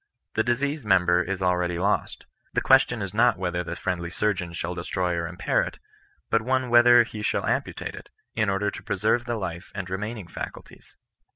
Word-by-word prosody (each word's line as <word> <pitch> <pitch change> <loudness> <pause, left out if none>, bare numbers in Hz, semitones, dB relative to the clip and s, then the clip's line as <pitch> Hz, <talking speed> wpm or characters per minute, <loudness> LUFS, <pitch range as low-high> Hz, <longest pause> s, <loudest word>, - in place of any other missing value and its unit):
The - - +2
diseased 140 +6 0
member 90 -3 +4
is 95 +1 -3
already 90 -1 +1
lost. 100 +4 -1 0.3
The - - +1
question 130 -5 +4
is 100 - -5
not 120 +3 +4
whether 90 -1 -2
the 85 0 -5
friendly 85 -1 -3
surgeon 95 -2 -1
shall 85 +1 -4
destroy 90 +1 -2
or 85 0 -2
impair 85 +1 0
it; - - -5 0.5
but 115 - +3
only 130 +2 0
whether 120 0 +7
he 110 -2 -8
shall - - 0
ampu - - -1
tate - - -5
it, - - -11 0.2
in 110 -2 +1
order 100 +1 0
to - - -8
preserve 110 +5 0
the 120 -1 -2
life 90 -4 -5
and 95 -3 -4
remaining 105 +2 -4
facul 85 - -7
ties. - - -19
100 Hz, 195 wpm, -25 LUFS, 90-115 Hz, 0.5 s, whether